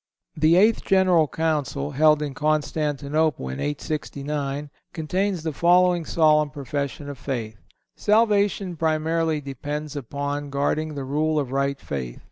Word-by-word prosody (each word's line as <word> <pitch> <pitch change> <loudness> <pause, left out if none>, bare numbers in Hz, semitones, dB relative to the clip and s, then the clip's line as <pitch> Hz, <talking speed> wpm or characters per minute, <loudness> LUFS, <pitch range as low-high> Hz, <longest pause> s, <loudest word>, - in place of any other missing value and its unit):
The 155 +1 +4
Eighth 215 +5 +4
General 185 -5 +4
Council, 150 -2 -1
held 150 +2 +4
in 145 -2 -4
Constantinople 150 - 0
in 65 - -5
869, 145 -1 -3 0.2
contains 180 +2 -1
the 160 -2 -2
following 175 +1 +3
solemn 155 -2 +3
profession 140 +1 -4
of 140 -3 -7
faith: 115 -6 -4 0.4
"Salvation 205 -4 +2
primarily 160 0 0
depends 145 +2 -5
upon 145 +2 -4
guarding 150 +2 -1
the 140 -2 -4
rule 155 +3 0
of 140 -4 -1
right 140 0 0
faith. 65 -4 -5
150 Hz, 125 wpm, -24 LUFS, 140-160 Hz, 0.4 s, The